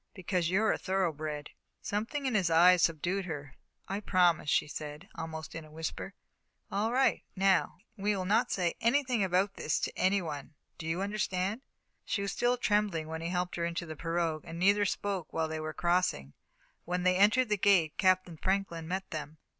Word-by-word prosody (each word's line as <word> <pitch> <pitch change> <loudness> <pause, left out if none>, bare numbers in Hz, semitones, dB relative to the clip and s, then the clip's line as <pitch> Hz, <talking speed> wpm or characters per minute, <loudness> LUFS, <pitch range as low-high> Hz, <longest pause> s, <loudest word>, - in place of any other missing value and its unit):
"Because 180 -2 -1
you're 210 +4 +3
a - - -1
thoroughbred." 155 -6 -2 0.3
Something 225 +8 -3
in 260 - 0
his 195 -5 +2
eyes 175 +2 +6
subdued 175 +4 +1
her. 145 -6 -6 0.3
"I 195 +1 -2
promise," 180 -6 +2
she - - +2
said, 150 +4 -7
almost 160 -1 -6
in 165 - -6
a 155 - -14
whisper. 160 +1 -5 0.6
"All 215 +3 0
right. 265 +2 +2
Now, 190 -2 +2 0.2
we'll 200 -2 -1
not 205 +4 +2
say 175 -3 +1
anything 250 -2 +2
about 190 +2 +1
this 155 - 0
to - - -3
any 195 +2 +2
one 150 -3 -6 0.2
do 160 - -5
you 170 +4 -1
understand?" 200 +1 -1 0.4
She 200 - -2
was 200 - -2
still 245 +3 +1
trembling 205 -9 0
when 160 0 -4
he 165 - -3
helped 180 0 -2
her 170 - -1
into 170 0 -3
the 160 -1 -7
pirogue, 165 -1 -1
and 165 0 -8
neither 200 +3 +4
spoke 195 -5 -2
while 160 -1 0
they 155 0 -4
were 155 0 -4
crossing. 175 - 0 0.5
When 180 0 -2
they 185 0 +4
entered 220 +5 +4
the 210 - +2
gate, 185 -6 +3
Captain 185 -3 +2
Franklin 185 -3 -1
met 190 +2 -3
them. 155 0 -6
180 Hz, 185 wpm, -31 LUFS, 160-200 Hz, 0.6 s, eyes